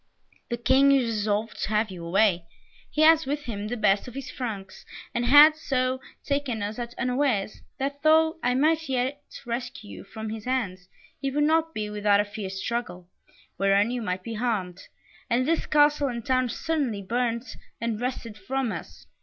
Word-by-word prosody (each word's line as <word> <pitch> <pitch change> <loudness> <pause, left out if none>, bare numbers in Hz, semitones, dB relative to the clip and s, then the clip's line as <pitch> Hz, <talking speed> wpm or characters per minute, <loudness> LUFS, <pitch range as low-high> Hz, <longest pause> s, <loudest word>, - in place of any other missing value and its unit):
"The 240 - -2
King 270 +4 +4
is 270 -3 +4
resolved 215 -1 -1
to - - -1
have 215 -1 +1
you 175 -2 -8
away; 180 0 +2 0.4
he 305 - -1
has 320 -2 +6
with 290 +1 -2
him 210 -5 -5
the 245 +3 -3
best 200 0 +2
of 245 - -10
his 275 - -6
Franks, 215 -7 -6 0.3
and 240 0 -1
has 300 +4 +8
so 255 -1 0 0.2
taken 280 -7 -1
us 210 +3 -4
at 240 0 -5
unawares, 250 -5 0 0.2
that 280 +1 -3
though 320 +1 +4
I 250 0 +1
might 315 +2 +2
yet 265 +2 -1 0.2
rescue 235 - -5
you 95 - -9
from 220 - -7
his 220 -1 -7
hands, 195 -8 -2 0.3
it 275 -1 -2
would 295 - +3
not 320 +1 +2
be 210 -1 -3
without 205 -1 +3
a 205 - +2
fierce 200 -2 -6
struggle, 190 -6 -4 0.5
wherein 195 +3 +3
you 245 -1 -2
might 185 -3 -3
be 230 - -5
harmed, 210 -6 -2 0.5
and 250 +1 +2
this 330 +1 0
castle 295 -1 +4
and 235 -3 -5
town 255 -1 +1
certainly 265 -9 -2
burnt, 235 +2 -2 0.2
and 230 -1 -2
wrested 240 -4 -4
from 255 +4 -2
us. 85 - -8
240 Hz, 180 wpm, -26 LUFS, 205-270 Hz, 0.5 s, has